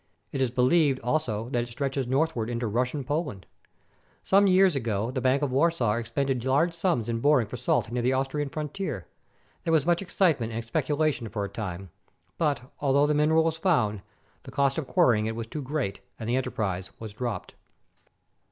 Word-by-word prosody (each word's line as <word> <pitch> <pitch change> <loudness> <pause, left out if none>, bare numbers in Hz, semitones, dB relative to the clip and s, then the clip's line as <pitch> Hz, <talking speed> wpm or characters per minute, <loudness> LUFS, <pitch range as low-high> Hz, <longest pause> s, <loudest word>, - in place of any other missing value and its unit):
It 135 - -2
is 130 - +2
believed, 130 +3 +3
also, 120 -4 -1
that 120 -2 0
it - - -13
stretches 135 +1 -2
northward 130 -4 0
into 120 0 -2
Russian 125 +6 -1
Poland. 145 - -3 0.8
Some 200 +1 +4
years 185 -2 +5
ago 115 -3 -1
the 130 0 -2
Bank 130 +3 +2
of 140 - 0
Warsaw 135 -5 +2
expended 120 +2 -1
large 140 +7 +2
sums 165 - 0
in 115 -1 -1
boring 140 -2 +4
for 105 - -7
salt 120 -2 0
near 120 0 -1
the 125 +2 +2
Austrian 135 +2 -1
frontier. 150 - -4 0.6
There 165 - -1
was 155 -3 +3
much 175 +1 +2
excitement 160 - +1
and 115 +1 -4
speculation 145 0 0
for 100 -1 -3
a - - -6
time; 95 -3 -6 0.5
but, 145 -6 +1 0.2
although 140 0 +3
the 150 - +2
mineral 155 +2 +3
was 160 0 0
found, 120 - +1 0.4
the - - -12
cost 140 +2 +1
of 145 - -5
quar - - +4
rying 110 -2 +2
it 115 - -3
was 115 0 -4
too 145 +6 -6
great, 135 -6 -3 0.2
and 110 - -5
the 120 - +1
enterprise 100 -8 -2
was 110 -2 -7
dropped. 120 0 -4
130 Hz, 190 wpm, -27 LUFS, 115-150 Hz, 0.8 s, years